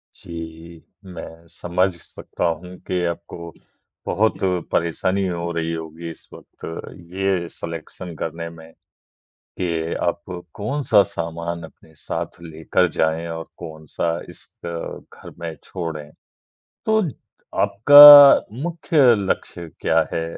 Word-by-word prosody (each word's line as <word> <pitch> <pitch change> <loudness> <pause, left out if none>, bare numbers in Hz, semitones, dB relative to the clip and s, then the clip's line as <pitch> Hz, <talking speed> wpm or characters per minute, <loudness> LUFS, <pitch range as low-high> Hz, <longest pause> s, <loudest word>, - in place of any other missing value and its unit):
जी। 80 0 -10 0.2
मैं 85 -2 -10
समझ 85 +2 -1
सकता 85 - -6
हूँ 90 +2 -5
कि 90 -1 -1
आपको 85 -1 -8 0.5
बहुत 110 +2 +1
ज़रूर 90 -2 0
परेशानी 95 +4 0
हो 85 -1 -3
रही 85 -1 -2
होगी 80 +1 -7
इस 80 - -12
वक़्त - - -13 0.5
ये 95 -2 0
सेलेक्शन 85 +1 -8
करने 85 +2 -5
में। 80 0 -14 0.9
कि 85 -2 -2
आप 85 0 -1 0.3
कौन-सा 120 -1 +2
सामान 85 -2 -5
अपने 80 0 -15
साथ - - -6
लेकर 80 +2 0
जाएँ 80 +2 0
और 80 0 -6
कौन-सा 80 -1 -5 0.2
इस - - -11 0.2
घर 85 -1 -8
में 85 -1 -5
छोड़े। 80 -4 -5 0.8
तो 220 0 +3 0.6
आपका 145 +4 +10 0.2
मुख्य 170 -1 -1 0.2
लक्ष्य 95 -3 -3
क्या 80 - +3
है? 80 - -1
85 Hz, 115 wpm, -21 LUFS, 80-95 Hz, 0.9 s, आपका